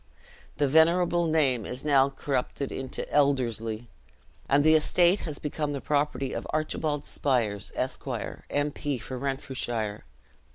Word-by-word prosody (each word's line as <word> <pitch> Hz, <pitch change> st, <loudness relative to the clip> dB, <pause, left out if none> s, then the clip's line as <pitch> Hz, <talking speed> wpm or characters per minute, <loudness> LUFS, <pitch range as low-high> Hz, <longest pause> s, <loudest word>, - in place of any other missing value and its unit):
The 145 Hz, -, +2 dB
venerable 170 Hz, +3 st, +4 dB
name 140 Hz, -7 st, +3 dB
is 125 Hz, +7 st, -6 dB
now 140 Hz, -2 st, +4 dB
corrupted 135 Hz, 0 st, -2 dB
into 130 Hz, -1 st, -4 dB
Elderslie, 120 Hz, -5 st, +1 dB, 0.6 s
and 140 Hz, +1 st, +4 dB
the 155 Hz, +1 st, +6 dB
estate 175 Hz, +4 st, +4 dB
has 145 Hz, -, -5 dB
become 150 Hz, 0 st, -3 dB
the 140 Hz, -, -3 dB
property 145 Hz, -2 st, 0 dB
of -, -, -4 dB
Archibald 155 Hz, -1 st, -1 dB
Spiers, 115 Hz, -7 st, -1 dB
Esq., -, -, -3 dB, 0.4 s
M. 145 Hz, +1 st, 0 dB
P. 145 Hz, -2 st, -3 dB
for 125 Hz, +2 st, -6 dB
Renfrewshire. 125 Hz, -6 st, -3 dB
140 Hz, 130 wpm, -27 LUFS, 130-150 Hz, 0.6 s, the